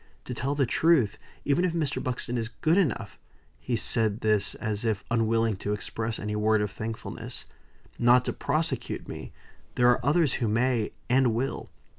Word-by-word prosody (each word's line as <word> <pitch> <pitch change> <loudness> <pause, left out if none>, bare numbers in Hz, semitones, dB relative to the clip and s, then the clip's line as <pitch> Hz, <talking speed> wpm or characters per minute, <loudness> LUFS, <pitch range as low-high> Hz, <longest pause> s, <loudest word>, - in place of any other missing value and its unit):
To 125 - -5
tell 135 +4 -2
the 140 -2 +2
truth, 135 -5 +3 0.3
even 145 +5 +2
if 180 -2 +1
Mr. 155 -5 -1
Buxton 125 -1 -2
is 115 -1 -2
good 155 +7 +1
enough" 160 - -1 0.4
(he 125 - -2
said 110 -1 0
this 105 -2 +2
as 105 0 -2
if 110 -4 0
unwilling 115 -2 +2
to 105 +2 -2
express 110 +2 -3
any 105 0 -3
word 105 0 +2
of 105 - -3
thankfulness) 110 +3 -6 0.5
"not 120 +1 +5
to - - -1
prosecute 155 +3 -2
me, - - -7 0.4
there 120 0 +5
are 120 - 0
others 150 -1 +3
who 115 - +2
may 115 0 +1
and 125 -2 +3
will. 130 +4 -2
115 Hz, 170 wpm, -27 LUFS, 110-135 Hz, 0.5 s, not